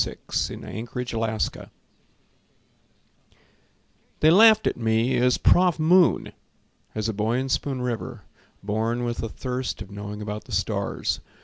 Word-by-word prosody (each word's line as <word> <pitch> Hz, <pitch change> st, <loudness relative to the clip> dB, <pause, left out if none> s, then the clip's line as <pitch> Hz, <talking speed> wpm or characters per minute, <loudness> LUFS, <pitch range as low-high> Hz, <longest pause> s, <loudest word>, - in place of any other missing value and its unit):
Alfonso 110 Hz, -, -4 dB
Churchill 115 Hz, -3 st, -3 dB, 2.5 s
They 155 Hz, -, +6 dB
laughed 220 Hz, +3 st, +7 dB
at -, -, +1 dB
me 115 Hz, +2 st, +1 dB
as 125 Hz, 0 st, +3 dB
"Prof. 180 Hz, -2 st, +4 dB
Moon," 170 Hz, +2 st, +3 dB, 0.6 s
As 110 Hz, 0 st, -1 dB
a 110 Hz, -, -1 dB
boy 110 Hz, +4 st, 0 dB
in 135 Hz, +1 st, -2 dB
Spoon 130 Hz, -1 st, -1 dB
River, 120 Hz, -3 st, -4 dB, 0.4 s
born 110 Hz, +4 st, -1 dB
with 120 Hz, -1 st, -2 dB
the 115 Hz, -, -3 dB
thirst 125 Hz, +3 st, -4 dB
Of 100 Hz, -1 st, -9 dB
knowing 100 Hz, +1 st, -7 dB
about 105 Hz, 0 st, -5 dB
the -, -, -10 dB
stars. -, -, -1 dB
120 Hz, 125 wpm, -24 LUFS, 110-130 Hz, 2.5 s, laughed